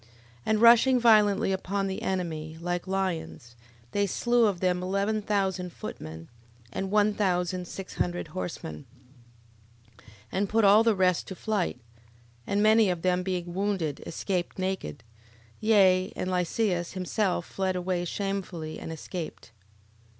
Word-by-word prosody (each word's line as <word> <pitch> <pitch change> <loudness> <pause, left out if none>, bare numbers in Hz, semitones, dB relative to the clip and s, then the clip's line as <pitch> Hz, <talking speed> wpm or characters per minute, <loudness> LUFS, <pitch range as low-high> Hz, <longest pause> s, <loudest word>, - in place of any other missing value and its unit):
11:11. 115 - -26 0.4
And 215 0 +2
rushing 240 +2 +7
violently 215 -3 +4
upon 195 +1 -1
the 190 -1 -3
enemy, 160 -4 -3
like 175 +1 -3
lions, 180 -10 -3 0.4
they 200 +5 +1
slew 240 +4 +2
of 195 -4 -1
them 180 -1 +1
eleven 200 +3 0
thousand 190 -3 -1
footmen, 80 - -8 0.5
and 195 - -3
one 210 +1 +3
thousand 180 -3 0
six 195 +1 -8
hundred 175 -2 -2
horsemen: 150 - -6 1.1
11:12. - - -19 0.3
And 195 +1 0
put 225 -1 +3
all 205 +3 +7
the 225 -2 +3
rest 185 -2 +2
to 190 - -6
flight; 205 -2 -1 0.7
and 205 +1 +1
many 215 -1 +5
of 175 -2 -2
them 180 0 +2
being 180 -2 -3
wounded, 190 -6 -1
escaped 180 +1 -3
naked: 185 - -3 0.6
Yea, 190 -4 +4
and 185 - -3
Lysias 180 0 0
himself 185 -1 -1
fled 190 -1 -2
away 180 -1 -1
shamefully, 180 -4 -4
and - - -6
escaped. 160 -5 -7
185 Hz, 140 wpm, -28 LUFS, 175-205 Hz, 1.1 s, rushing